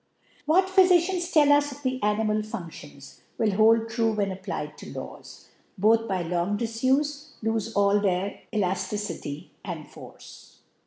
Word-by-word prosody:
What 360 +5 +4
Phyfidansl 370 -1 +4
ttil 305 -5 +4
us'Of 290 -1 -1
the 255 0 -2
animal 210 +1 +1
Fun£tions, 165 -9 -8 0.2
wHl 215 -3 +2
hold 225 +2 +4
true>hen 220 -3 0
apt>Iied 190 0 -6
to - - -11
Law^: - - -9 0.3
Both, 225 +3 +3
by 185 -3 -1
long^ 175 +4 -1
Difufe, 275 +6 -1
lofe 225 0 -1
all 200 0 +4
their 195 0 -1
ElafKcity 190 -5 -3
and 165 -6 -6
Force. - - -14
220 Hz, 125 wpm, -26 LUFS, 195-270 Hz, 0.3 s, What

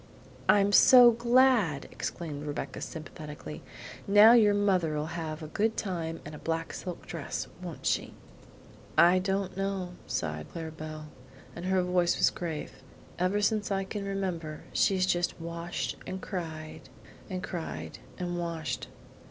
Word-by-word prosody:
"I'm 200 0 +5
so 245 +2 +9
glad!" 235 - +3
exclaimed 150 -4 -5
Rebecca 145 -2 -4
sympathetically. 150 - -8 0.5
"Now 205 +3 +8
your 210 -4 +6
mother'll 180 -7 +1
have 160 -1 -4
a - - -5
good 220 +8 0
time 165 -5 -3
and 150 - -8
a 150 - -8
black 165 0 -2
silk 180 -2 -6
dress, 165 -4 -4
won't 175 -3 -7
she?" - - 0 0.8
"I 175 +2 +7
don't 190 0 -1
know," 195 -2 -2
sighed 75 -1 -3
Clara 160 -1 -5
Belle, 155 -1 -8 0.5
and 175 - -6
her 185 0 +2
voice 180 -1 +2
was - - +4
grave. 165 -4 -5 0.4
"Ever 185 +3 +1
since 210 -1 +1
I 195 0 +1
can 200 +1 -5
remember 180 -6 -3
she's 190 -2 +3
just 175 -2 0
washed 170 +1 -4
and 190 - -4
cried 160 -5 -6 0.4
and 185 -1 -4
cried 170 -3 -5 0.2
and 175 -1 -3
washed. 165 -6 -3
175 Hz, 140 wpm, -29 LUFS, 160-195 Hz, 0.8 s, so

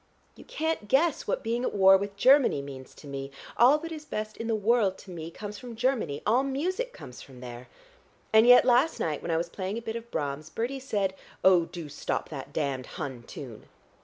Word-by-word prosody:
You - - -13
can't 320 -8 -2
guess 285 +6 +2
what - - -1
being 235 +2 -1
at - - -2
war 195 -1 +7
with 200 +1 -2
Germany 260 - +5
means 135 -2 -10
to - - -14
me. 135 -1 -5 0.3
All 255 +5 +6
that 330 +2 -7
is 310 -2 -6
best 215 -7 -5
in 230 - -5
the 225 - +1
world 210 -2 +2
to 190 - -12
me 165 -2 -6
comes 205 +3 -8
from 245 -2 -9
Germany; 225 - -1
all 235 +5 +4
music 360 - -2
comes 125 - -11
from 130 -2 -13
there. 125 0 -9 0.7
And 220 +2 +7
yet 245 0 +8
last 255 +6 +3
night 155 -3 -1
when - - -6
I 165 - +2
was 170 +1 -1
playing 190 +4 -4
a - - -4
bit 225 -1 -4
of 235 0 -7
Brahms, 150 -3 -3
Bertie 245 +9 -3
said, 205 -7 -1 0.3
'Oh, 180 -3 +6
do 170 -2 -8
stop 145 - -3
that 140 -2 -7
damned 140 -4 -2
Hun 135 -7 -5
tune!' 120 -7 -9
205 Hz, 215 wpm, -28 LUFS, 150-245 Hz, 0.7 s, yet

